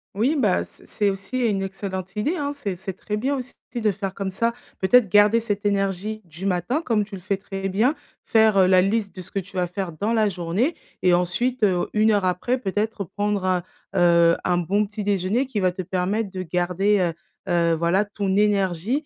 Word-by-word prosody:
Oui, 260 +9 +1
bah 205 -8 +2
c - - -18
c'est 205 -1 0
aussi 195 +6 -4
une 200 -4 +1
excellente 190 0 -5
idée, 295 +13 0
hein, 285 -1 -2
c'est 205 -10 -4
c'est 190 +1 -5
très 210 +2 -4
bien 270 +6 0
aussi 255 -2 -5 0.2
de 220 -3 +2
faire 195 0 -4
comme 195 -1 -3
ça, 230 +5 0 0.3
peut-être 215 +2 +4
garder 210 +4 +5
cette 205 -2 -3
énergie 200 +1 -1
du 170 +2 -9
matin 195 - 0
comme 225 -8 +1
tu 205 0 -9
le 185 - -9
fais 195 +2 -1
très 195 0 -5
bien, 220 +10 +2 0.3
faire, 220 -2 +4
heu, 190 - +6
la 185 -1 +6
liste 200 +1 0
de 185 - -8
ce 180 - -11
que 195 - -1
tu 195 0 -9
vas 180 -1 +1
faire 180 0 -4
dans 205 +8 -2
la 215 -2 +3
journée 185 - -1 0.3
et 180 -1 +4
ensuite, 215 +8 0
heu, 185 -4 +2
1 215 +1 +3
heure 205 -2 +2
après 185 +8 0
peut-être, 210 -1 -2
heu, - - -10
prendre 205 -2 0
un, 185 -1 +1 0.3
heu, 170 -1 +5
un 180 -1 +2
bon 195 +5 +1
petit 210 +1 -6
déjeuner 200 +5 +1
qui 230 -5 -2
va 185 -2 +1
te 185 - -4
permettre 190 +4 -1
de 185 -1 -4
garder, 180 +4 +1
heu 170 -2 +1 0.3
heu, 170 -2 +2
voilà 170 +5 +2
ton 200 -2 -2
énergie 205 - +1
195 Hz, 215 wpm, -23 LUFS, 185-215 Hz, 0.3 s, heu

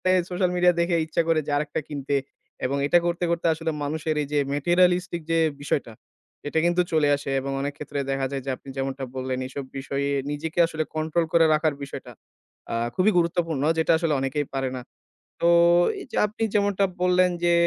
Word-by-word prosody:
এ - - +5 0.2
social 180 0 +1
media 180 0 +4
দেখে 170 0 +2
ইচ্ছা 160 +1 0
করে 165 -1 +3
যে - - -2
আরেকটা 145 0 -2
কিনতে। 140 -1 -3 0.5
এবং 140 +2 0
এটা 175 - +5
করতে, 175 0 0
করতে 170 0 0
আসলে 160 0 -3
মানুষের 155 +2 -2
এই 145 - -3
যে - - +2 0.2
materialistic 175 +3 +2
যে 165 - +3 0.2
বিষয়টা, 140 -5 -2 0.5
এটা 160 - +1
কিন্তু 175 +1 +3
চলে 155 -2 +3
আসে 140 0 -6
এবং 135 +1 -4
অনেক 140 +1 -2
ক্ষেত্রে 145 -1 -5
দেখা 135 0 0
যায় 135 -1 -3
যে - - -3
আপনি 135 - -14
যেমনটা 135 0 -3
বললেন, 130 0 -2
এসব 135 +1 -6
বিষয়ে 140 +1 -2 0.2
নিজেকে 155 +3 -4
আসলে 160 -1 -2
কন্ট্রোল 160 +2 0
করে 165 -1 +6
রাখার 155 0 +2
বিষয়টা। 140 - -8 0.6
আ - - -1 0.2
খুবই 195 +4 +3
গুরুত্বপূর্ণ 165 -4 0
যেটা 160 - +2
আসলে 165 -2 0
অনেকেই 135 +2 -1
পারে 135 -1 -1
না। - - -5 0.6
তো 170 - +4 0.5
এই - - -8
যে - - -4
আপনি 215 +2 -5
যেমনটা 200 -1 +2 0.2
বললেন 180 0 +4
যে 175 0 +4
155 Hz, 190 wpm, -25 LUFS, 140-175 Hz, 0.6 s, করে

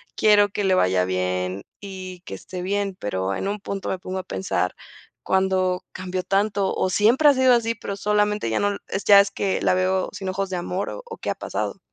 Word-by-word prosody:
quiero 205 -1 +5
que 205 +1 -3
le 190 -1 +3
vaya 90 - +3
bien, 90 +1 -2 0.2
y 185 -2 -8
que - - -6
esté 180 -1 -7
bien. 200 0 -1
Pero, 95 -1 -2
en 195 - -3
un 205 +1 -2
punto 195 -1 -5
me - - -1
pongo 185 +1 -5
a - - -5
pensar, 95 - -2 0.5
¿cuándo 190 -1 +1
cambió 185 0 -3
tanto? 200 +1 +1
O, 185 - 0
¿siempre 235 +10 +4
ha 285 - +6
sido 260 -1 +4
así? 230 -1 0
Pero 200 -2 -6
solamente 210 - +1
ya - - +1
no 205 - +2
l 200 - -3 0.3
Ya 200 -1 +9
es 200 0 -2
que, 195 -1 -1
la - - +3
veo 185 0 +1
sin 190 - -5
ojos 195 +1 -2
de 180 - -1
amor, 180 +2 -3
o - - -7
o, 460 -1 -9
¿qué - - -3
ha - - -3
pasado? - - -4
190 Hz, 220 wpm, -23 LUFS, 180-205 Hz, 0.5 s, Ya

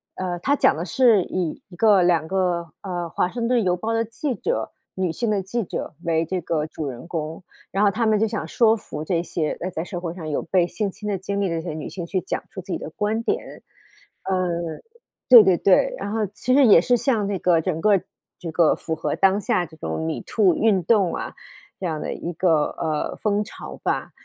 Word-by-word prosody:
呃， 180 -2 -3
它 280 +10 +2
讲 - - +4
的 160 - -3
是 220 +2 +4
以 175 -4 -3
1 180 - -12
个 205 0 +5
2 170 -3 +2
个， 175 -3 -1
呃， 175 -3 -4
华 180 - 0
盛 230 +3 -2
顿 240 -2 +2
邮 180 -1 +1
报 225 +5 -2
的 225 0 +1
记 240 +5 -3
者， 465 - -2 0.2
女 185 -2 0
性 230 +7 -2
的 205 -2 +1
记 235 +5 -2
者 165 - -5
为 165 -1 +1
这 185 +3 -2
个 155 -2 -1
主 155 -1 -5
人 125 +2 -7
公， 165 +1 -5 0.3
然 195 +2 +1
后 205 - +5
她 230 +2 0
们 215 -1 +3
就 220 - +3
想 205 -8 -4
说 225 +5 +3
服 155 -6 -7
这 170 0 0
些， 160 -2 -2
呃， 185 - -3
在 160 -3 -4
社 180 0 -5
会 170 -2 -4
上 165 -3 -7
有 145 - -1
被 180 0 +2
性 210 +2 -2
侵 210 +2 -8
的 200 - 0
经 200 +2 -3
历 195 - +1
的 165 - -1
这 170 - -9
些 160 - -3
女 155 - -5
性 175 -3 -6
去 185 +1 -1
讲 - - -3
出 190 - -7
自 185 +1 -9
己 - - 0
的 - - -7
观 210 +6 -1
点。 420 - -3 0.6
呃， 185 -1 0 0.8
对 240 -4 +11
对 190 -2 +4
对。 - - +3
然 - - -4
后 220 0 0
其 215 +6 -2
实 280 -2 +6
也 205 - +8
是 245 - +3
像 225 -5 +1
那 200 -2 -1
个 170 -2 +3
整 165 -1 -2
个 205 -3 +4 0.4
这 170 - -6
个 165 -1 +4
符 160 - -3
合 160 - -2
当 195 +1 +4
下 180 -2 +1
这 160 - -15
种 80 - -4
MeToo 185 - +1
运 210 -4 +3
动 195 -2 +3
啊， - - -5 0.5
这 190 - -4
样 160 -3 -2
的 - - -3
一 175 - -5
个， 165 -3 +2
呃， 155 -2 -2
风 210 0 0
潮 - - -9
吧。 - - -1
185 Hz, 255 characters per minute, -23 LUFS, 165-210 Hz, 0.8 s, 对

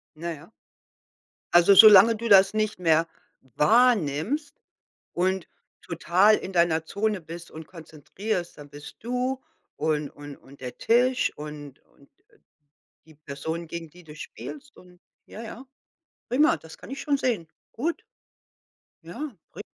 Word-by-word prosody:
Ja, 170 +2 -6
ja. 160 +2 -11 1.0
Also 175 +3 +6
solange 215 +1 +9
du 230 +2 -5
das 195 0 +6
nicht 215 -2 -1
mehr 165 -1 +2 0.3
wahrnimmst 220 - +1 0.6
und 185 0 -1 0.3
total 180 +5 +2
in 190 - -7
deiner 170 -2 +2
Zone 205 +1 -2
bist 165 +2 -10
und 160 0 -10
konzentrierst, 175 +4 -6
dann 145 -1 -11
bist 145 +1 -12
du 250 +3 -3 0.3
und 150 -1 -1
und 145 -1 -11
und 140 +1 -18
der 125 -1 -7
Tisch 250 +2 +2
und 150 -2 -9
und, 140 - -25
äh, - - -37 0.8
die 160 - -18
Person, 155 +3 -6
gegen 165 -1 -8
die 180 +2 -17
du 150 -2 -13
spielst 275 - -10
und 180 -1 -18 0.3
ja, 220 - -9
ja. 235 +3 -10 0.7
Prima, 295 +6 +3
das 160 0 -14
kann - - -13
ich 270 - -6
schon 285 -2 0
sehen. 230 -11 -1 0.3
Gut. 320 +9 -3 1.0
Ja, - - -10 0.4
ri - - -8
175 Hz, 140 wpm, -25 LUFS, 155-225 Hz, 1.0 s, solange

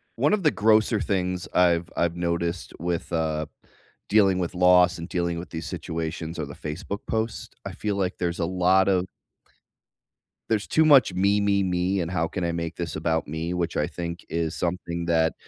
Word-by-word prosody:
One - - +2
of 200 -4 +1
the 150 - +4
grosser 110 0 +3
things 90 -3 -1
I've 85 -1 +3
I've 85 0 0
noticed 85 0 -2
with, 85 +1 -3
uh, 80 -1 0 0.6
dealing 95 -3 +4
with 90 0 -3
loss 90 0 +5
and 85 0 -6
dealing 85 -1 -1
with 85 - -8
these 80 0 -6
situations 80 -1 -4
are 75 - -2
the 70 - -10
Facebook 80 +6 -5
posts. 110 0 -2 0.2
I - - -4
feel, 105 -2 -2
like, 95 -2 -1
there's 85 -1 -2
a 85 - +1
lot 95 +2 +3
of 95 -2 +2 1.4
there's 110 -2 0
too 160 - +3
much 140 -10 +6
me, 100 +3 +2
me, 100 -1 +2
me, 90 +1 0
and 85 -2 -2
how 85 -2 0
can 90 - -4
I 85 - 0
make 85 0 -4
this 85 -3 -4
about 80 0 -1
me, 80 +3 -3
which 85 -1 -2
I 75 - +2
think 85 0 -6
is 85 -1 -2
something 85 -1 -3
that 80 -1 +2
90 Hz, 190 wpm, -25 LUFS, 85-95 Hz, 1.4 s, much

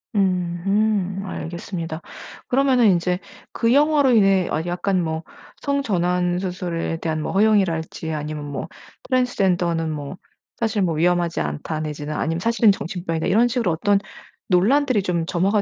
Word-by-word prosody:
으흠 195 +1 0
알겠습니다. 170 -2 -5 0.5
그러면은 260 -3 +3
인제 180 +1 0 0.3
그 230 0 +1
영화로 290 -1 +4
인해 195 -5 +4
아 160 +2 -1
약간 180 +1 0
뭐 160 0 -3 0.4
성전환 180 -10 0
수술에 175 -3 -3
대한 160 -1 -2
뭐 - - -3
허용이랄지 190 -6 +1
아니면 150 0 -4
뭐 145 -1 -5 0.4
트랜스젠더는 180 - +1
뭐 145 +2 -5 0.4
사실 220 -2 0
뭐 170 -4 +1
위험하지 175 - +1
않다 80 - -3
내지는 150 0 -4
아니면 165 +1 -1
사실은 230 +2 +4
정신병이다 170 -3 -3
이런 225 +5 +4
식으로 240 -6 0
어떤 200 +5 +2 0.5
논란들이 235 +5 +3
좀 170 -3 -1
점화가 195 +5 +1
180 Hz, 330 characters per minute, -22 LUFS, 165-210 Hz, 0.5 s, 영화로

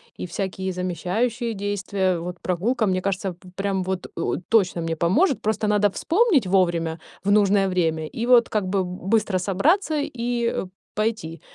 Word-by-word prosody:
и - - -5
всякие 190 +1 -3
замещающие 190 +7 -1
действия. 195 -3 -1
Вот 175 +1 -6
прогулка, 215 +6 0
мне 185 -1 0
кажется, 195 0 -1
в 180 +1 -16
прям 195 -1 -1
вот 185 0 -3
у - - -1
точно 185 -2 +1
мне 165 0 -2
поможет. 230 - +2
Просто 215 0 0
надо 210 0 +3
вспомнить 340 - +2
вовремя, 170 -3 +1 0.3
в 200 - +2
нужное 200 -1 +4
время, 160 -4 0
и 230 - -4
вот 245 -1 +6
как 215 -2 0
бы 190 -1 0
быстро 190 +2 0
собраться 300 - +1
и, 240 -3 -2
э, - - -1 0.3
пойти. 215 -7 -2
195 Hz, 160 wpm, -23 LUFS, 180-225 Hz, 0.3 s, вот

